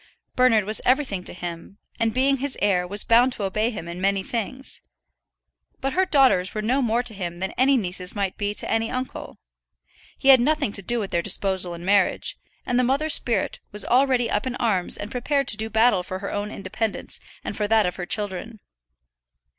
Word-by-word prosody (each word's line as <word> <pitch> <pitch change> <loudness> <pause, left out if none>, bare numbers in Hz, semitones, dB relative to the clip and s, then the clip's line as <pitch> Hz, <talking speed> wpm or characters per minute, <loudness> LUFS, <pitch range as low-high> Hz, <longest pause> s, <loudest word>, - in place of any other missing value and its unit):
Bernard 250 -4 +4
was 215 +2 -1
everything 255 -8 +1
to - - -3
him, 175 +2 -8 0.2
and 230 - +2
as 220 - -9
being 275 +2 +3
his 275 +1 -1
heir 180 -3 +1
was 205 +3 +2
bound 240 +3 +4
to 210 - -6
obey 215 +4 0
him 200 -8 -7
in 170 +2 -7
many 195 0 +1
things. 240 +5 -4 1.0
But 270 0 -2
her 375 0 +2
daughters 260 - +3
were 215 - -1
no 255 +5 +1
more 235 0 +1
to 235 - -4
him 175 -4 -5
than 190 +2 -3
any 265 +2 +3
nieces 180 -3 -3
might 195 -2 -2
be 205 0 -2
to - - -2
any 225 0 0
uncle. 255 0 -5 0.8
He 275 - +1
had 265 -1 +9
nothing 295 -3 +1
to 200 - -3
do 235 +5 0
with 200 -3 -4
their 170 - +1
disposal 185 -1 0
in 170 +1 -9
marriage; 200 -1 +2 0.3
and 245 0 +1
the - - +3
mother's 280 +5 +2
spirit 235 - +1
was 210 0 0
already 255 -1 +3
up 225 +2 -1
in 250 - -3
arms 200 -8 0
and 205 +2 -7
prepared 275 +2 -1
to - - +3
do 220 +1 -3
battle 220 -2 +3
for 185 +1 -6
her 200 +1 -5
own 205 0 -3
independence, 195 +2 -4 0.2
and - - -5
for 210 - -1
that 220 0 +3
of 180 - -3
her 180 -1 -5
children. 210 +2 -2
220 Hz, 210 wpm, -23 LUFS, 190-250 Hz, 1.0 s, had